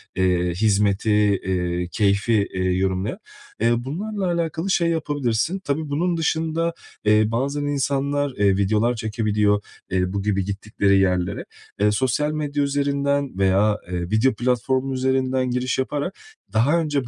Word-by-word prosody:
eee, 90 -1 +1
hizmeti, 105 +1 +2 0.3
eee, 90 -1 -1
keyfi, 100 +1 +2
eee, 95 - -1
yorumlayan. 95 +2 -1 0.4
Ya, 120 +1 +2
bunlarla 195 - -3 0.2
alakalı 165 +3 -2
şey 170 -2 +2
yapabilirsin. 145 - -1
Tabii 155 -3 -3
bunun 170 +4 0
dışında, 165 +1 0 0.3
eee, 105 0 +5
bazen 140 +5 -1
insanlar, 140 0 0
eee, 100 -2 +3
videolar 105 +5 +2
çekebiliyor, 105 -2 +1 0.3
eee, 90 0 0
bu 100 - -1
gibi 100 -2 0
gittikleri 100 -1 +1
yerlere. 90 -2 0 0.3
Eee, 105 +1 +3
sosyal 130 +6 0
medya 145 -1 -1
üzerinden 140 -3 0
veya, 100 +2 +3
eee, 90 -1 -2
video 110 +5 +3
platformu 125 +3 0
üzerinden 130 0 0
giriş 125 +1 -1
yaparak 145 +7 -2 0.4
daha 135 +10 +3
önce 145 -6 -1
120 Hz, 135 wpm, -22 LUFS, 100-145 Hz, 0.4 s, eee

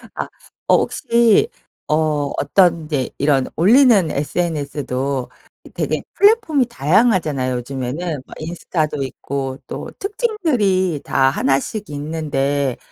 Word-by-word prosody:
아. - - -4 0.4
어 - - +6
혹시 235 - +3 0.4
어 150 -2 0
어떤 170 +1 +3
이제 145 -5 -2
이런 140 -2 +2
올리는 215 - +5
SNS도 140 -4 -2 0.5
되게 - - -1
플랫폼이 400 - +4
다양하잖아요 155 - +1
요즘에는. 135 +5 -4
뭐 - - -12
인스타도 155 -3 -2
있고 135 0 -4
또 - - -6
특징들이 270 - 0
다 135 0 +2
1 135 0 +1
씩 210 +8 -6
있는데 145 -3 -1
155 Hz, 235 characters per minute, -19 LUFS, 140-205 Hz, 0.5 s, 어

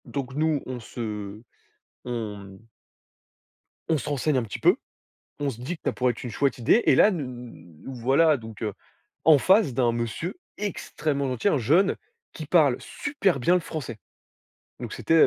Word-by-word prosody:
Donc 135 -2 -5
nous, 155 -1 +1
on 130 -1 -5
se 105 -3 -6 0.6
on 115 -4 -4
mmh 100 +2 -13 1.2
on 160 - +3
se - - -6
renseigne 145 0 +1
un 125 - +1
petit 110 - -6
peu, - - +5 0.6
on 145 -1 0
se 120 -3 -7
dit 145 +8 -3
que 160 - -23
ça - - +1
pourrait 125 -1 +2
être 115 - -10
une 125 - -4
chouette 140 +4 0
idée, 130 - +3
et - - +5
là, 215 - +6
nous 125 - -8
voilà 140 +6 +4
donc 110 -3 -11
heu, 105 -3 -2 0.5
en 155 -1 +8
face 185 - +4
d'un 120 -1 +2
monsieur 120 - -3 0.2
extrêmement 150 -8 -2
gentil, 125 - -1
un 150 - +2
jeune 160 - +3 0.4
qui 155 - -7
parle 145 -5 +4
super 240 - -1
bien 175 +8 +3
le - - +3
français, 135 -9 -6 0.8
donc - - -6
c'était, 165 - 0
130 Hz, 175 wpm, -26 LUFS, 115-155 Hz, 1.2 s, en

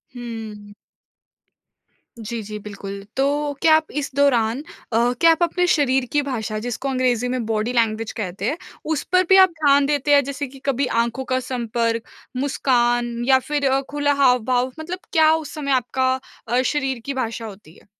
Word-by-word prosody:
हुँ। 220 -4 -8 1.4
जी, 225 +1 -5
जी, 210 +1 -7
बिल्कुल। 200 -1 -8
तो 285 +2 +1
क्या 315 -1 +6
आप 315 0 0
इस 280 - -5
दौरान, 255 -2 +2 0.3
अ, 235 +2 +3
क्या 330 0 +6
आप 325 +2 +2
अपने 360 +1 +1
शरीर 265 -3 +2
की 295 - +2
भाषा, 225 -6 -3
जिसको 245 +4 -4
अंग्रेज़ी 250 -2 +1
में 250 -2 -2
बॉडी 225 +2 -1
लैंग्वेज 225 -1 0
कहते 190 -2 -5
हैं, 315 - -3 0.3
उस 310 -2 -1
पर 365 0 +5
भी 380 - +7
आप 375 - +4
ध्यान 285 -2 +4
देते 290 0 +1
हैं? 280 -1 +6
जैसे 280 +1 -4
कि 270 +1 -14
कभी 275 0 +1 0.2
आँखों 235 +3 -4
का 255 - +2
संपर्क 235 -2 -2 0.3
मुस्कान 240 -3 +1
या 265 -1 +6
फिर 285 +1 -1
अ, 270 +1 +2
खुला 290 0 +1
हाव-भाव, 250 0 +2
मतलब 350 +4 -5
क्या 315 -2 +5
उस 310 -2 -6
समय 285 -2 -3
आपका 260 0 +1 0.3
अ, 245 +3 +2
शरीर 265 -2 -1
की 280 - -3
भाषा 230 -3 -3
होती 195 -6 -12
है? - - -21
255 Hz, 175 wpm, -21 LUFS, 230-285 Hz, 1.4 s, भी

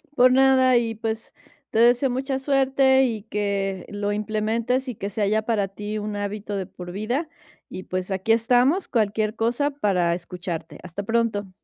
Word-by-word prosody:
Por 255 0 +6
nada, 260 -1 +5
y, 230 -1 -1
pues, 220 +1 -4 0.4
te 220 - +1
deseo 245 +3 +4
mucha 265 +2 -2
suerte, 265 -1 +3
y 220 -5 -3
que 200 -3 -2
lo 205 0 -2
implementes, 220 +5 -1
y 245 - -4
que 200 +1 -4
sea 205 0 -1
ya 215 +1 +1
para 215 -3 0
ti 210 +2 -5
un 210 0 -4
hábito 205 0 -4
de 195 -1 -2
por 180 0 -9
vida. 240 - -2 0.4
Y, 185 - -7
pues, 185 +1 -4
aquí 190 +3 0
estamos, 245 - +3
cualquier 215 -2 0
cosa, 240 +6 0
para 185 -10 +1
escucharte. 175 -1 -6
Hasta 185 +3 -6
pronto. 220 -2 0
220 Hz, 170 wpm, -24 LUFS, 200-250 Hz, 0.4 s, Por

